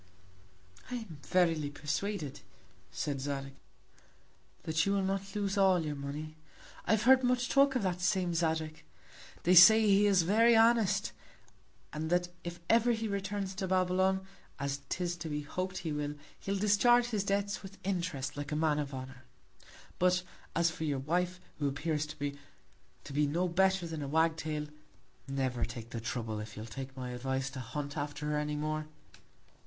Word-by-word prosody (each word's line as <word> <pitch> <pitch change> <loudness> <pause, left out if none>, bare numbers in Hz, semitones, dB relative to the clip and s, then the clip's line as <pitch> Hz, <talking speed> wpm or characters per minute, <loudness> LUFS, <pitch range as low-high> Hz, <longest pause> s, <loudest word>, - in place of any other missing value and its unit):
I 250 - -3
am 205 -11 -7
verily 165 -5 +2
persuaded, 150 +1 -3 0.5
said 140 -3 -3
Zadig, 135 -1 -4 1.1
that 160 +1 +1
you 195 - +1
will 200 -1 +1
not 195 +1 -2
lose 200 -1 0
all 185 -4 +4
your 150 - -2
Money. 150 +3 -6 0.5
I - - +2
have 220 0 +2
heard 260 +1 +6
much 250 0 +1
talk 275 -1 +4
of 250 - +1
that 180 -1 -1
same 180 -1 +1
Zadig; 160 -1 -1 0.6
they 180 - +4
say 220 +5 +9
he 205 0 +5
is 195 -4 +4
very 225 +6 +5
honest, 225 -4 +4 0.8
and 155 +1 -3
that 175 0 +1
if 175 0 -6
ever 235 +1 +4
he 225 0 -2
returns 200 -1 -3
to 190 0 -3
Babylon, 185 +1 +2 0.3
as 140 0 -3
'tis 175 -1 -1
to 170 -2 -6
be 150 0 -3
hop'd 185 +5 -4
he 165 -4 -3
will, 150 0 -3 0.2
he'll 195 0 -2
discharge 225 +4 +4
his 210 -4 0
Debts 200 0 -1
with 195 0 -11
Interest, 170 -8 -2
like 145 +1 -5
a - - 0
Man 155 -1 +2
of 140 -2 -4
Honour. 130 -1 -9 0.7
But, 180 0 +3 0.3
as 170 0 +3
for 160 - -6
your 145 -3 0
Wife, 175 +6 -1 0.2
who 145 - +1
appears 150 +2 -1
to 150 - -8
me, 140 0 -3 0.6
to 140 - -9
be 145 +1 +2
no 170 +5 0
better 190 +1 +2
than 160 -2 -5
a 140 - -3
Wag 160 +2 +2
tail, 155 -2 -3 0.6
never 130 -3 -1
take 115 -1 -6
the 115 - -4
Trouble, 115 -2 -3
if 105 -1 -8
you'll 110 - -6
take 130 +4 -8
my 125 -1 -4
Advice, 130 +2 -2
to 135 - -7
hunt 145 +4 -5
after 145 0 -4
her 150 - +1
any 150 0 -2
more. 155 +1 -2
165 Hz, 175 wpm, -32 LUFS, 145-195 Hz, 1.1 s, say